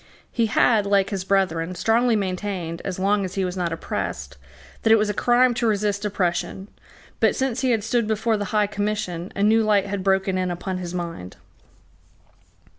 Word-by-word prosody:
He 230 -1 +1
had, 215 -1 +3
like 200 0 +2
his 195 -2 -2
brethren, 185 -3 0
strongly 230 +4 +2
maintained, 185 -4 -3
as 190 -2 -4
long 200 +2 +1
as 185 0 -5
he 195 -1 0
was 180 0 -4
not 175 -2 -2
oppressed, 65 - -4 0.5
that 225 - +2
it - - +9
was 210 -1 +1
a - - -5
crime 245 +3 +3
to 235 0 0
resist 205 -1 0
oppression; 190 0 -2 0.5
but, - - +3
since 265 -2 -1
he 260 - +1
had 225 -4 +1
stood 230 0 0
before 220 +1 +1
the 205 -1 -2
High 210 +1 +1
Commission, 205 -4 -3
a 200 - 0
new 220 +2 +4
light 210 -3 +2
had 200 -1 -4
broken 190 -1 +1
in 185 -1 -1
upon 185 +1 -4
his 180 0 -5
mind. 165 - -6
200 Hz, 190 wpm, -23 LUFS, 185-215 Hz, 0.5 s, it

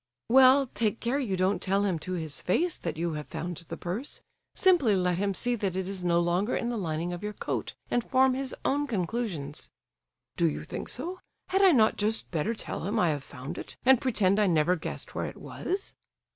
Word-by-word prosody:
"Well, 265 +2 +7
take 230 -3 -1
care 245 +4 0
you 205 -9 -1
don't 185 +2 +1
tell 195 +1 +1
him 180 -5 0
to 185 +4 -5
his 160 -5 -3
face 335 - +1
that 165 -2 -4
you 170 0 -1
have 150 -1 -5
found 175 +1 -5
the - - -6
purse. 200 +11 -5 0.3
Simply 340 - +4
let 180 -1 +1
him 200 -1 0
see 245 +5 +2
that 200 -6 -2
it 190 -1 -2
is 190 -2 -3
no 170 -1 +3
longer 175 +6 +1
in 240 0 -1
the - - -2
lining 170 -2 -2
of 175 - -6
your 210 0 -4
coat, - - -4 0.2
and 240 - +2
form 260 +1 +3
his 265 0 -3
own 290 +1 +1
conclusions." 185 - -3 0.7
"Do 85 - +3
you 75 0 -5
think - - -6
so? 350 +9 -4 0.3
Had 385 +1 +2
I 385 -2 +7
not 220 -7 +4
just 215 +2 0
better 175 +7 -1
tell 190 - -5
him 205 +4 -1
I 175 - +3
have 145 -3 -2
found 140 +5 -7
it, - - -9
and 260 -1 +6
pretend 210 -6 +2
I 210 - +4
never 170 +1 +3
guessed 160 - -6
where - - -2
it - - -9
was?" 385 +2 -4
200 Hz, 215 wpm, -28 LUFS, 175-245 Hz, 0.7 s, Well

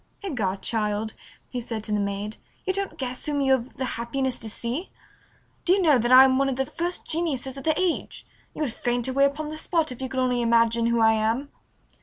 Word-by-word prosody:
"Egad, 210 - -2
child," 215 -1 0 0.3
he 250 - -4
said 225 -2 -4
to 215 - -5
the 210 - +1
maid, 200 +1 -3 0.3
"you 380 - +1
don't 390 -4 -2
guess 255 -2 -3
whom 290 -1 0
you 270 -1 +2
have 260 -1 0
the 265 - -1
happiness 255 +2 -2
to 225 - -6
see! 240 - -3 0.7
Do 360 - +4
you 395 - +3
know 300 -6 +5
that 240 +2 0
I 255 +1 +10
am 265 0 +4
one 275 0 +2
of 265 - -1
the 265 +1 0
first 345 +5 -3
geniuses 285 -6 -2
of 275 - -8
the 315 -1 +2
age? 365 -3 -1 0.3
You 310 - -2
would 250 -6 -2
faint 240 0 -1
away 275 +2 +3
upon 300 +2 -2
the 310 - -6
spot 320 -2 0
if 250 - -8
you 260 - -3
could 260 - -2
only 250 -1 +1
imagine 230 0 +3
who 235 0 +2
I 220 0 +6
am!" 225 +6 0
255 Hz, 230 wpm, -25 LUFS, 230-285 Hz, 0.7 s, I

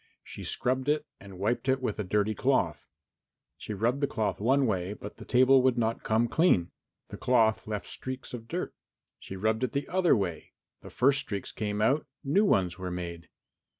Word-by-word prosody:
She - - -9
scrubbed 130 +2 -1
it 150 +1 +1
and 100 -1 -12
wiped 115 +7 -1
it 130 0 +3
with 110 -5 -3
a - - 0
dirty 105 +3 +1
cloth. - - 0 0.7
She 105 - -6
rubbed 120 +7 0
the 140 - +2
cloth 110 -6 -2
one 135 +5 +3
way, 95 -3 -1
but 105 -1 -9
the - - -10
table 130 +1 +5
would 130 -1 +2
not 115 -1 0
come 110 +2 +2
clean. 120 - +3 0.4
The - - -7
cloth 115 -4 +2
left 105 -2 -3
streaks 130 0 -6
of 115 -2 -7
dirt. - - -3 0.5
She 95 - -8
rubbed 110 +4 0
it 130 - -1
the 140 - -2
other 185 -1 +3
way 90 -5 -4 0.3
the - - -10
first 135 +1 +3
streaks 100 -7 -5
came 105 0 -2
out, 145 +6 +2 0.2
new 175 +10 +3
ones 95 - +1
were 90 -1 -4
made. 85 -1 -6
115 Hz, 190 wpm, -29 LUFS, 100-130 Hz, 0.7 s, table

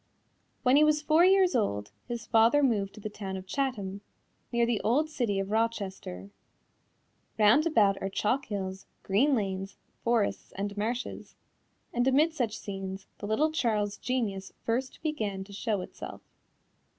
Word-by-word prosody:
When 260 +1 +5
he 300 - +7
was 305 0 +4
four 315 +3 +5
years 375 -3 +5
old, 105 - 0 0.2
his 235 -2 -4
father 230 +6 +4
moved 205 -7 +1
to - - -10
the 215 - -5
town 195 -2 -5
of 185 - -8
Chatham, 200 -4 -2 0.5
near 235 0 +3
the 230 -3 0
old 300 +8 +1
city 235 -9 0
of 195 +1 -3
Rochester. 195 - -2 1.1
Round 225 +9 +5
about 205 -11 +3
are 195 - -1
chalk 250 +8 0
hills, 190 -2 -4 0.2
green 260 +9 +3
lanes, 195 -3 -3 0.3
forests 230 -3 0
and 200 +1 -3
marshes, 230 +4 -3 0.6
and 245 +1 +1
amid 300 +5 +4
such 235 -8 -1
scenes 195 -1 -6
the 205 - -5
little 300 +9 +2
Charles's 210 -8 0
genius 215 -7 -2
first 255 +3 -2
began 215 -11 -2
to 200 +1 -13
show 210 -1 -1
itself. - - -8
220 Hz, 150 wpm, -29 LUFS, 195-260 Hz, 1.1 s, he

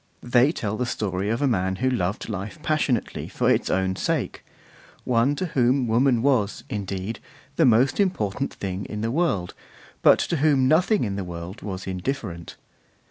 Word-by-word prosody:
They 125 +3 +4
tell 110 -9 -3
the 125 - -1
story 100 -4 -2
of 115 +5 0
a - - +3
man 95 -6 0
who 130 +7 -1
loved 95 -4 -2
life 100 - -5
passionately 145 -6 0
for - - +1
its - - +1
own 95 0 +1
sake: - - -2 0.6
one 125 +4 +2
to 185 - -2
whom 125 +1 +3
woman 120 +1 +3
was, 120 -5 +1
indeed, 100 0 -4 0.4
the 165 - +4
most 125 - +4
important 140 - 0
thing 95 0 -5
in 105 - -5
the 115 +1 -1
world, 130 - 0 0.5
but - - +7
to 170 - -1
whom 140 -3 +3
nothing 180 +8 +3
in 100 -3 -2
the 100 - -2
world 90 +2 -7
was 95 -2 -5
indifferent. 95 -2 -4
115 Hz, 170 wpm, -24 LUFS, 95-135 Hz, 0.6 s, but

